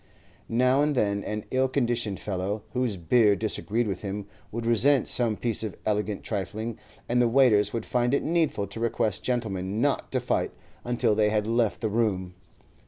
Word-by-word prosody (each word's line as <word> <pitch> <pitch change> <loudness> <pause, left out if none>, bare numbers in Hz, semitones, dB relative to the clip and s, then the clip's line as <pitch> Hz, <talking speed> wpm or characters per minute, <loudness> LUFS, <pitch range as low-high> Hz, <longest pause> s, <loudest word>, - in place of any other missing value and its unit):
Now 125 +4 +3
and 150 0 +1
then 100 -4 +1
an 105 0 -4
ill 130 0 +2
conditioned 120 -6 -1
fellow, 100 +2 -3
whose 125 -5 0
beer 105 +4 +4
disagreed 110 +2 -1
with 95 -3 -3
him, 100 0 -4 0.3
would 115 +1 -4
resent 125 +4 +3
some 115 -4 +1
piece 115 -3 0
of 110 -4 -4
elegant 105 -1 -1
trifling, 110 +2 -4 0.3
and 125 +1 +2
the 120 - +4
waiters 115 -4 +4
would 115 -2 -3
find 125 +2 +1
it - - 0
needful 160 -11 +1
to 100 +3 -8
request 110 -3 0
gentlemen 105 -5 -2
not 140 +2 0
to - - +2
fight - - -1 0.3
until 120 -2 +1
they 105 0 +3
had 105 -1 0
left 115 -1 0
the 110 - 0
room. 100 -5 0
110 Hz, 175 wpm, -27 LUFS, 105-120 Hz, 0.3 s, beer